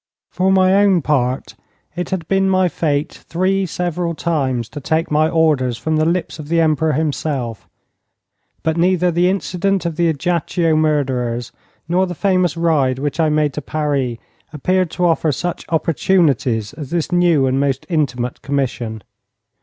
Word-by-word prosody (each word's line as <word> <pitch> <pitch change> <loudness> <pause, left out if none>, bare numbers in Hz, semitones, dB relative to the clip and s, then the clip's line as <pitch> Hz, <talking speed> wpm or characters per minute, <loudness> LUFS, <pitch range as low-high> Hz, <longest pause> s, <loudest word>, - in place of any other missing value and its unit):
For 185 +2 +1
my 190 0 +4
own 190 -6 +3
part, 130 -3 0 0.4
it 180 -1 -3
had 175 -4 -3
been 195 0 +2
my 185 -1 +3
fate 150 -2 -1
three 190 +2 -1
several 175 0 -2
times 135 -9 -1
to 145 - -7
take 160 +4 -1
my 155 +1 +3
orders 150 -8 +2
from 160 +4 -1
the 155 - +2
lips 170 -1 -2
of 150 - -7
the 165 +2 +1
Emperor 160 -1 +2
himself, 140 -6 -2 0.9
but 160 0 0
neither 180 0 +2
the 175 +2 +2
incident 195 0 -1
of 165 -2 -3
the 170 -1 +2
Ajaccio 165 +2 0
murderers 130 -6 0 0.4
nor 185 +3 +2
the 180 - -5
famous 185 -2 +1
ride 150 -6 +2
which 145 +4 -3
I 160 -1 +3
made 150 -2 +1
to 150 - -4
Paris 140 -5 -1 0.3
appeared 185 +4 0
to 180 +2 -1
offer 165 -2 +2
such 175 +6 -4
opportunities 155 - +1
as 145 -5 -8
this 170 -1 -2
new 175 -6 +3
and 130 +1 +1
most 135 -1 -1
intimate 125 -7 -1
commission. 120 -6 -3
160 Hz, 160 wpm, -18 LUFS, 140-175 Hz, 0.9 s, my